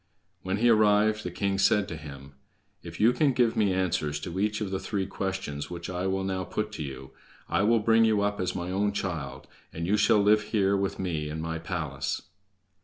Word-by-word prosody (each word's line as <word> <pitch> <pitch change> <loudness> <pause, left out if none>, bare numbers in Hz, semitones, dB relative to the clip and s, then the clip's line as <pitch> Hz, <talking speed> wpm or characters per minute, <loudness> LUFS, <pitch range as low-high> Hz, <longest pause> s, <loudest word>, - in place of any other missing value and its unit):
When 95 +1 -2
he 120 +3 +3
arrived 105 -1 +4
the - - -3
king 100 -1 -1
said 100 +1 +3
to 80 - -5
him: 70 -2 -10 0.5
"If - - -9
you 115 +3 +5
can 145 -2 +2
give 120 -2 +2
me 105 -3 +2
answers 90 -6 0
to 90 +2 -5
each 105 +1 0
of 105 -3 -3
the 95 - -1
three 100 -3 -2
questions 95 -7 -4
which 85 0 -6
I 90 +1 -2
will 95 0 -1
now 95 -1 -2
put 105 +3 -3
to 80 - -5
you, 65 -1 -8 0.4
I - - +1
will 115 +3 +4
bring 115 +1 +4
you 110 -2 +3
up 105 0 -1
as 90 - -2
my 90 0 -3
own 100 +2 0
child, 85 -9 -4 0.3
and 85 +1 -4
you 100 +4 +2
shall 105 - +4
live 105 +1 +4
here 100 -2 +1
with 100 0 -1
me 80 -5 -2
in 80 +1 -5
my 80 0 -3
palace." 80 -5 -3
95 Hz, 215 wpm, -27 LUFS, 85-105 Hz, 0.5 s, you